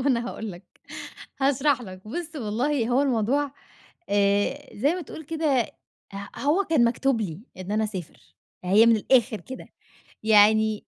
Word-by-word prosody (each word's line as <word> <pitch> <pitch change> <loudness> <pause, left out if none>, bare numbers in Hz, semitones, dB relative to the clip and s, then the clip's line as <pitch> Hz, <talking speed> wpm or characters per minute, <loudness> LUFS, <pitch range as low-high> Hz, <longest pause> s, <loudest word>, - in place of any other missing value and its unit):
ما 280 - -3
أنا 240 -3 +1
هاقول 220 -1 -6
لَك 175 +2 -13 0.7
هاشرح 275 -1 +2
لَك. 185 0 -11
بُص 330 +5 -5
والله، 240 +2 -1
هو 255 +3 +3
الموضوع 270 +2 +1 0.6
آآ 205 +8 +1
زي 280 +10 +2
ما 365 - -4
تقول 315 -1 -10
كده، 305 -4 +1 0.5
ه 200 0 -6
هو 310 +8 +2
كان 295 -7 +4
مكتوب 240 +1 +1
لي 175 -5 -4 0.2
إن 185 +2 -5
أنا 215 +1 +1
أسافر، 190 -7 -7 0.4
هي 205 +5 +5
من 230 -1 +6
الآخر 235 0 +2
كده، 260 - -9 0.6
يعني 215 0 +4
235 Hz, 155 wpm, -25 LUFS, 210-280 Hz, 0.7 s, من